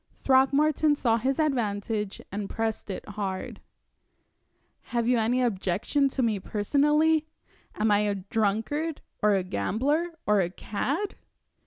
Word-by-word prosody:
Throckmorton 285 +3 +3
saw 230 -5 +2
his 260 +4 0
advantage, 215 -7 -1
and 200 0 -4
pressed 225 -2 -3
it 190 - -5
hard. 200 -2 -4 1.2
"Have 235 -1 -1
you 245 -1 +3
any 245 +3 +2
objection 220 +6 +1
to 265 -1 -1
me 220 -4 +1
personally? 295 +10 +2 0.5
Am 215 0 +1
I 205 - +5
a 205 -1 0
drunkard, 220 - -1 0.2
or 210 -1 +4
a 190 - +1
gambler, 275 - -1
or 210 -1 +4
a 175 - 0
cad?" 280 - -3
225 Hz, 130 wpm, -27 LUFS, 205-285 Hz, 1.2 s, I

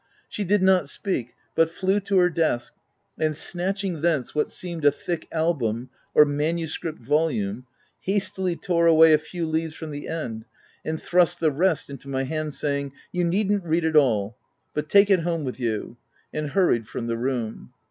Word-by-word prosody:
She 210 - -4
did 200 0 +2
not 185 -6 +4
speak, 130 - -3 0.2
but 165 0 +3
flew 190 +4 +1
to 200 -1 0
her 180 -1 +5
desk, 155 -8 0 0.5
and 155 -1 0
snatching 185 -1 -3
thence 155 -6 0
what 150 - 0
seemed 170 -3 -6
a 145 - +7
thick 165 +3 -4
album 130 -8 -1 0.2
or 150 - +8
manuscript 155 +2 -2
volume, 130 -5 0 0.3
hastily 190 -2 -1
tore 170 -1 +1
away 160 -1 +7
a 155 - +5
few 170 +2 -5
leaves 160 0 -2
from 160 -2 -7
the 145 0 -6
end, 115 -9 -4 0.4
and 160 0 -3
thrust 175 0 +2
the 160 -2 +3
rest 165 +3 +1
into 140 0 -10
my 135 -1 -1
hand, 155 +1 -3
saying, 140 -2 -2
" - - -31
You 180 -1 0
needn't 200 +3 +1
read 165 0 +1
it 160 -1 0
all; 110 -7 +3 0.4
but 150 0 -3
take 200 0 +6
it 190 - +6
home 165 -1 -1
with 130 -3 -5
you,"— 115 0 -3 0.4
and 155 -1 -2
hurried 140 - +2
from 115 - -5
the 115 0 -1
room. 120 - -3
160 Hz, 180 wpm, -25 LUFS, 140-175 Hz, 0.5 s, or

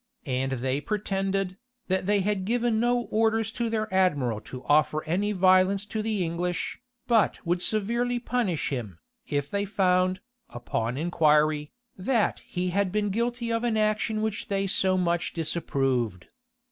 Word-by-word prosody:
And 130 -1 -1
they 130 +2 -1
pretended, 195 -1 -1 0.3
that 190 0 0
they 205 -1 +3
had 200 0 0
given 230 +1 +1
no 240 +1 +2
orders 225 0 +2
to 235 0 -2
their 215 -1 -1
admiral 145 - +2
to 125 +4 -9
offer 155 +1 +2
any 195 +6 0
violence 185 +1 +4
to 215 +1 -3
the 215 -3 -1
English, 175 +5 -2 0.2
but 225 -6 +2
would 175 +1 0
severely 235 +5 0
punish 235 -9 -1
him, 115 - -4 0.3
if 145 -1 -2
they 200 0 0
found, 185 -2 +2 0.3
upon 120 0 -3
inquiry, 150 -2 +2 0.3
that 225 +2 +1
he 180 +1 -3
had 195 0 +1
been 205 0 0
guilty 235 +2 -1
of 230 +1 -1
an 235 -2 +1
action 215 0 +1
which 220 -2 -2
they 195 -1 0
so 190 -1 +2
much 175 -1 0
disapproved. 135 - -1
190 Hz, 150 wpm, -27 LUFS, 155-215 Hz, 0.3 s, violence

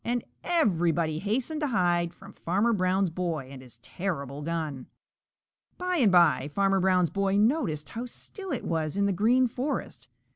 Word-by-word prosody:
And 240 0 -1 0.2
everybody 170 - +1
hastened 250 - -2
to 300 - +1
hide 175 -7 +1
from 195 +3 -14
Farmer 200 +7 +1
Brown's 185 -2 +1
boy 165 -6 -3
and 135 -2 -9
his 125 -2 -12
terrible 145 -7 -4
gun. 155 -4 -4 0.9
By 360 0 -1
and 230 - +4
by 170 -6 +4
Farmer 195 +5 +1
Brown's 180 -2 +2
boy 195 0 +1
noticed 205 - +1
how 235 +2 -5
still 385 - -9
it - - -2
was 160 +1 -1
in 200 - +2
the 200 - +1
Green 235 +7 +3
Forest. 260 +4 -4
190 Hz, 160 wpm, -27 LUFS, 165-230 Hz, 0.9 s, and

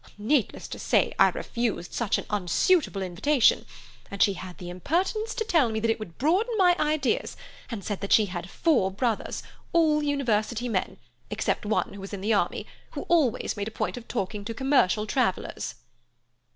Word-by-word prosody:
Needless 225 +4 0
to - - -7
say, - - +2
I - - +7
refused 230 -7 -3
such 235 -4 0
an - - -5
unsuitable 210 - +2
invitation, 220 +9 +2 0.4
and 200 - -7
she 200 - +3
had 185 -1 -9
the 180 - -8
impertinence 370 - -1
to 450 - -1
tell 330 - +3
me 220 0 -2
that 225 +1 +2
it 225 - -2
would 175 -6 -9
broaden 390 - +1
my 360 -3 +5
ideas, 305 0 0 0.3
and 225 -5 -5
said 205 -3 -4
that 200 - -4
she 215 - +6
had 180 -2 -6
four 255 - +2
brothers, 220 +3 -2 0.3
all 315 -3 +4
University 245 -5 0
men, 230 - -2 0.3
except 210 - -1
one 215 - 0
who 200 - -9
was 195 +1 -8
in 195 - -5
the 215 +3 +1
army, 205 - 0 0.3
who - - -4
always 310 -9 +2
made 205 0 -3
a 220 - -9
point - - -1
of 245 -1 -9
talking 205 -2 -3
to 225 +2 -5
commercial 245 -6 +2
travellers." 225 -5 -1
225 Hz, 180 wpm, -26 LUFS, 200-300 Hz, 0.4 s, I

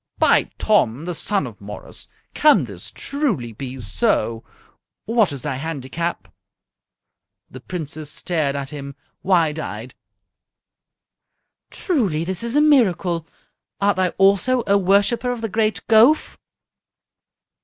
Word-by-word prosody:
"By - - +3
Tom, 155 - +1
the 175 - -3
son 195 +1 -1
of 115 -5 -10
Morris! 105 +1 -9 0.3
Can 280 - +4
this 100 -5 -9
truly 220 - -2
be 130 +3 -7
so? 115 - 0 0.6
What 225 -5 +2
is 135 -3 -6
thy 130 - -3
handicap?" 160 +3 -4 1.2
The 130 - -9
Princess 155 0 -6
stared 155 -4 -1
at 140 0 -4
him, 140 -2 -7 0.3
wide 165 -5 +2
eyed. 115 -3 -6 1.8
"Truly 205 - -1
this 185 +1 -3
is 235 +2 -3
a 295 - +5
miracle! 185 - +2 0.5
Art 200 0 +2
thou 185 -1 +2
also 200 +6 +3
a 200 - +3
worshipper 200 +6 +2
of 245 -2 -5
the 225 - -1
great 215 -2 -1
Gowf?" 230 +8 +4
175 Hz, 120 wpm, -21 LUFS, 140-215 Hz, 1.8 s, a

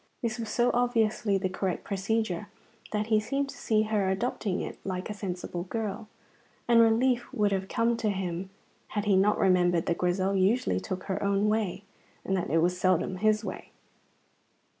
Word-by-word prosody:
This 230 0 -2
was 225 -2 -4
so 240 +3 +2
obviously 225 -4 +2
the 190 0 -1
correct 185 -1 -3
procedure 200 -1 -1 0.4
that 210 0 0
he 215 - +6
seemed 275 +6 -2
to - - -8
see 215 -1 +1
her 210 -3 0
adopting 195 -1 -1
it - - -6
like 185 +2 -4
a - - -3
sensible 180 -3 -5
girl, 215 +1 -4 0.6
and 235 -1 +6
relief 240 +2 +2
would 210 -1 +1
have 190 -1 -1
come 230 +2 +1
to 225 -2 0
him 190 -1 -3 0.5
had 205 - 0
he 205 -2 +4
not 200 +2 +3
remembered 180 -3 +3
that 170 - -1
Grizel 185 +2 +1
usually 205 +7 +2
took 185 -3 -5
her 190 - -3
own 200 +1 +2
way, 210 -3 -1 0.4
and 190 - 0
that 180 - -2
it 165 +3 +3
was 180 +1 +1
seldom 185 0 +2
his 215 +2 +2
way. 185 - -6
200 Hz, 180 wpm, -28 LUFS, 185-220 Hz, 0.6 s, he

